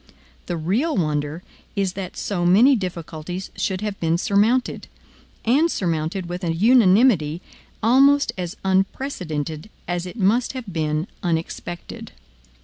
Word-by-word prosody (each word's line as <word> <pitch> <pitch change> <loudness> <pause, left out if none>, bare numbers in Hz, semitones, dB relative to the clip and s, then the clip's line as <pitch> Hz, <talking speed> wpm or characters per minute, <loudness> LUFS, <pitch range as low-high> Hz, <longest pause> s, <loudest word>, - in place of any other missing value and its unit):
The 175 - -2
real 210 - 0
wonder 150 0 -1 0.3
is 195 -3 0
that 190 -2 -6
so 185 -4 -2
many 215 +11 +6
difficulties 180 -2 -5
should 190 -1 -2
have 210 -2 -4
been 165 0 +1
surmounted, 215 +7 +1 0.6
and 285 +9 +4
surmounted 170 - -2
with 175 +2 -6
a 170 - 0
unanimity 195 - +4 0.4
almost 275 +5 +5
as 180 -1 -5
unprecedented 185 - -2 0.2
as 175 0 -2
it 180 - -9
must 225 +6 +2
have 260 -3 -6
been 155 -1 -1 0.2
unexpected. 175 0 -4
185 Hz, 125 wpm, -22 LUFS, 165-220 Hz, 0.6 s, many